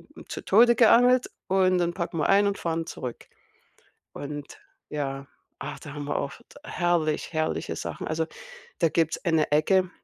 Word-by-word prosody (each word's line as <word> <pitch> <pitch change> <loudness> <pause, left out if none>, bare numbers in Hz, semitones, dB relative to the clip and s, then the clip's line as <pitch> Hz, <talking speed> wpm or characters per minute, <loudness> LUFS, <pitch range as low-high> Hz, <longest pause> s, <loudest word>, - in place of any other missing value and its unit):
hm, - - -12
zu - - -6
Tode 235 +4 +5
geangelt 245 +2 +5 0.2
und 185 -1 +3
dann 175 -1 0
packen 170 -2 -4
wir 150 - +1
ein 200 +1 +5
und 200 - -1
fahren 165 -1 -2
zurück. 125 -7 -7 0.8
Und 145 0 -7 0.3
ja, 140 -2 -4 0.3
ah, - - -6
da 145 - -9
haben 145 -1 -5
wir 145 - -2
auch 140 - -3
d 265 +4 -18
herrlich, 175 - 0
herrliche 155 0 -1
Sachen. - - -5
Also 160 +1 0 0.5
da 165 - +3
gibt's 160 0 0
eine 160 -3 +2
Ecke 185 +5 +3
165 Hz, 165 wpm, -26 LUFS, 150-190 Hz, 0.8 s, Tode